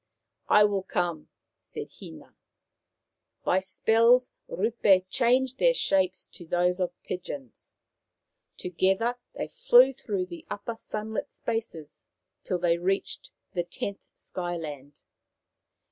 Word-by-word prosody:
' 115 0 -57
" - - -51
I 210 - +6
will 205 -2 +2
come," 175 -4 -2 0.3
said - - -8
Hina. 80 - -12 1.1
By 185 - +3
spells 230 +6 +3 0.2
Rup6 215 - +3
changed 255 +1 +2
their - - +4
shapes 190 - +1
to - - -8
those 180 +2 +1
of 180 -1 -2
pigeons. 145 -9 -7 0.8
To 180 - -4
gether 195 +8 +1 0.2
they - - -3
flew 270 - +5
through 200 -7 -3
the 175 -2 -10
upper 225 +3 -4
sunlit 220 0 -5
spaces 220 -10 -5 0.4
till 185 - -1
they 170 -1 +2
reached 195 - -1 0.2
the 175 - +1
tenth 200 +3 -4
Sky 175 -1 -5
land. 145 -3 -8
190 Hz, 125 wpm, -28 LUFS, 175-230 Hz, 1.1 s, I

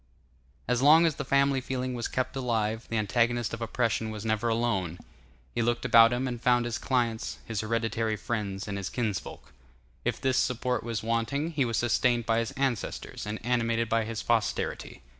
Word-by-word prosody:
As 125 +1 +1
long 155 +4 +7
as 165 - +2
family 140 -1 +2
feeling 130 0 -3
was 120 -1 -2
kept 130 +1 -2
alive, 115 -3 -1
the 115 - -1
antagonist 115 +2 +1
of 115 - -5
oppression 115 -1 0
was 110 0 -6
never 110 +1 0
alone; 105 -7 0 0.6
he 120 - 0
looked 120 +1 0
about 115 0 +7
him, 125 +2 -1
and 120 -2 -4
found 120 -1 +3
his 120 -1 -3
clients, 120 -4 -1
his 110 -3 -2
hereditary 115 0 -1
friends, 100 -3 -3
and 100 -1 -3
his 95 - -4
kinsfolk. 110 -6 -4 0.5
If - - -1
this 130 -1 +1
support 125 0 0
was 115 -2 -3
wanting, 115 +8 -1
he 145 -5 +1
was 115 -2 -1
sustained 120 0 +2
by 115 0 +2
his 115 -1 -1
ancestors 130 -6 -3
and 105 +1 -3
animated 115 -2 +1
by 115 -1 +1
his 115 0 -4
posterity. 115 - -1
115 Hz, 180 wpm, -28 LUFS, 110-125 Hz, 0.6 s, long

